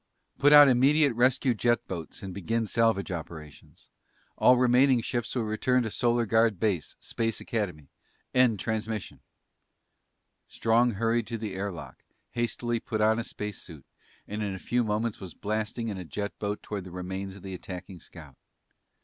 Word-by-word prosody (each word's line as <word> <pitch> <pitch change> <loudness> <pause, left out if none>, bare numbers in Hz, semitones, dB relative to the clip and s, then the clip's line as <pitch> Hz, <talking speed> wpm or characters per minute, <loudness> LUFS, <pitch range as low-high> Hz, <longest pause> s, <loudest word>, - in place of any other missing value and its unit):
Put 145 +1 +5
out 145 -1 +10
immediate 135 +2 +4
rescue 125 +2 +3
jet 120 +1 +1
boats 85 -1 -7
and 95 -1 -6
begin 115 +5 -1
salvage 110 -3 +1
operations. 80 -3 -9 0.4
All 125 - +5
remaining 125 +1 +4
ships 120 +1 -3
will 120 - 0
return 125 +4 +1
to 110 - -4
Solar 120 0 +1
Guard 110 -2 +2
base, 95 -8 -1
Space 115 -2 -2
Academy. 90 - -4 0.4
End 125 -5 +4
transmission!" 110 -1 -3 1.3
Strong 115 +1 +2
hurried 115 +3 0
to 115 - -4
the 110 -3 -5
air 100 +1 -3
lock, 85 -4 -10 0.3
hastily 120 0 -1
put 110 -1 -4
on 110 +1 +3
a - - -2
space 105 -3 -6
suit, 80 -5 -11 0.4
and 105 +1 -4
in 100 -2 -2
a - - -6
few 120 +5 0
moments 110 +1 -1
was 95 -3 -9
blasting 110 +2 -3
in 100 -3 -5
a - - -5
jet 100 +6 -4
boat 105 0 -3
toward 100 -3 -5
the - - -8
remains 95 +2 -5
of 100 - -13
the 95 -1 -6
attacking 90 0 -8
scout. 75 -7 -13
110 Hz, 165 wpm, -28 LUFS, 95-120 Hz, 1.3 s, out